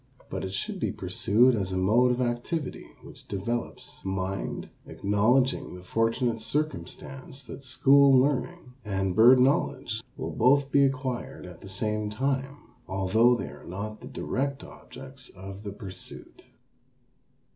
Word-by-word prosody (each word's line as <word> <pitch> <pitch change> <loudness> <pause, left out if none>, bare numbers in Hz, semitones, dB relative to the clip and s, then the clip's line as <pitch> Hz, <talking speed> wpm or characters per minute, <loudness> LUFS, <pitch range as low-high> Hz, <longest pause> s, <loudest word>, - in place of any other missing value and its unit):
But - - -3
it 95 - -4
should - - -3
be - - 0
pursued 120 +5 +3
as 95 -4 -1
a 95 - -1
mode 110 +7 +4
of 125 +1 +1
activity 125 +5 -2 0.2
which - - -13
develops 115 +3 -4
mind, 95 0 -3 0.2
acknowledging 110 +5 +1
the 90 - -11
fortunate 115 +3 0
circumstance 135 -1 -4
that 130 - -9
school 135 +1 +5
learning 140 +2 -1
and 95 -3 -1
bird 125 +3 +8
knowledge 130 -3 +1 0.2
will - - -4
both 135 +3 +3
be 140 - +5
acquired 130 -2 -3
at 90 -2 -11
the 95 - -10
same 105 +2 -2
time, 135 +4 -3 0.2
although 105 +6 +3
they - - -4
are - - -12
not 105 +4 -6
the - - -9
direct 140 +1 -2
objects 135 0 -11
of 95 +1 -9
the 105 -1 -6
pursuit. 95 -2 -8
120 Hz, 140 wpm, -27 LUFS, 100-135 Hz, 0.2 s, bird